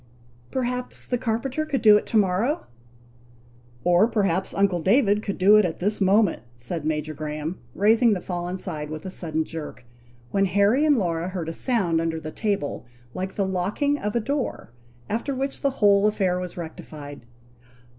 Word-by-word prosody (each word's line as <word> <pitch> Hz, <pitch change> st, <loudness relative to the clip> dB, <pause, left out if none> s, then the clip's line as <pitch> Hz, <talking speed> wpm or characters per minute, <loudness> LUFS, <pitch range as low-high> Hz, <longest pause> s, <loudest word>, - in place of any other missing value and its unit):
"Perhaps 250 Hz, -1 st, -2 dB
the 245 Hz, -, -1 dB
carpenter 250 Hz, +6 st, -1 dB
could 285 Hz, -5 st, -2 dB
do 210 Hz, -2 st, +8 dB
it 210 Hz, -, +1 dB
to 225 Hz, -, +1 dB
morrow!" 210 Hz, -, +1 dB, 1.2 s
"Or, 175 Hz, +4 st, +4 dB
perhaps 195 Hz, -5 st, 0 dB
uncle 195 Hz, -3 st, +1 dB
David 205 Hz, -, +3 dB
could 200 Hz, -2 st, -4 dB
do 200 Hz, +3 st, +6 dB
it 180 Hz, -6 st, +2 dB
this 205 Hz, +3 st, -1 dB
moment," 195 Hz, -, +3 dB
said 145 Hz, +7 st, -4 dB
Major 155 Hz, 0 st, -2 dB
Graham, 155 Hz, +3 st, -5 dB, 0.2 s
raising 225 Hz, +3 st, +4 dB
the 190 Hz, -, -1 dB
fallen 175 Hz, 0 st, -4 dB
side 150 Hz, -4 st, -4 dB
with 155 Hz, +2 st, -7 dB
a 190 Hz, -, -4 dB
sudden 160 Hz, -3 st, -1 dB
jerk, 155 Hz, -6 st, -8 dB, 0.5 s
when 195 Hz, 0 st, +2 dB
Harry 205 Hz, +9 st, +3 dB
and 295 Hz, -3 st, +4 dB
Laura 170 Hz, -4 st, -1 dB
heard 175 Hz, -4 st, -4 dB
a -, -, -4 dB
sound 180 Hz, -8 st, +1 dB
under 165 Hz, -1 st, -2 dB
the 155 Hz, 0 st, -7 dB
table 195 Hz, -, -2 dB, 0.3 s
like 190 Hz, +1 st, -4 dB
the 200 Hz, -, 0 dB
locking 200 Hz, +11 st, 0 dB
of 210 Hz, +1 st, -3 dB
a -, -, +3 dB
door, 265 Hz, -, -3 dB, 0.4 s
after 235 Hz, +6 st, -2 dB
which 270 Hz, +1 st, -3 dB
the 280 Hz, -, +2 dB
whole 205 Hz, -5 st, +4 dB
affair 190 Hz, -4 st, +1 dB
was 180 Hz, -1 st, -6 dB
rectified. 150 Hz, -4 st, -8 dB
195 Hz, 170 wpm, -24 LUFS, 165-225 Hz, 1.2 s, do